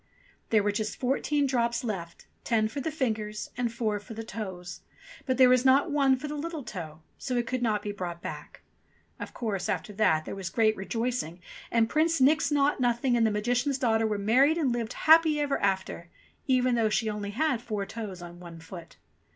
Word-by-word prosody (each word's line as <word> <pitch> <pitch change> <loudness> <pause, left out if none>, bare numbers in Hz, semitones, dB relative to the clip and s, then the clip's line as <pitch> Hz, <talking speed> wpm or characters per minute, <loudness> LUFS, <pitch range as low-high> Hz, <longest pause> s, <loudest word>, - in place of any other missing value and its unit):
There 215 -2 +3
were 205 - +1
just 215 +1 -3
fourteen 280 +3 +1
drops 235 -2 0
left, 185 -7 -5 0.2
ten 220 -2 +2
for 250 +6 -5
the 320 - -2
fingers 220 -8 -3
and 245 -2 -1
four 220 -3 -1
for 220 +2 -11
the 225 - -5
toes; 185 -6 -7 0.5
but 260 -1 +1
there 260 -1 +7
was 250 0 +4
not 275 +4 +4
one 275 -2 +4
for 260 +4 -6
the 295 - -5
little 310 0 -5
toe, 160 -7 -8 0.2
so 255 -2 -2
it 240 - 0
could 255 +1 -2
not 215 -3 0
be 205 - -3
brought 180 -4 -5
back. - - -8 0.6
Of - - -7
course, 205 -6 -3
after 210 - -2
that 160 -7 +2
there - - -5
was 195 -2 -5
great 220 0 +2
rejoicing, 225 -3 -3 0.3
and 230 -1 +3
Prince 320 +4 +1
Nix 285 +2 +4
Naught 290 0 +2
Nothing 245 0 +1
and 230 -1 +3
the - - +2
Magician's 245 +6 0
daughter 225 -3 +2
were 210 -1 -1
married 255 +10 +3
and 290 -7 +1
lived 235 -2 -2
happy 315 -1 +5
ever 290 -1 0
after, 190 -3 -1 0.4
even 255 -1 +3
though 230 -2 +2
she 220 +1 0
only 210 -1 -3
had 260 +2 0
four 215 -5 -3
toes 195 -5 -7
on 175 0 -10
one 170 -2 -10
foot. 165 +1 -11
230 Hz, 200 wpm, -28 LUFS, 205-260 Hz, 0.6 s, there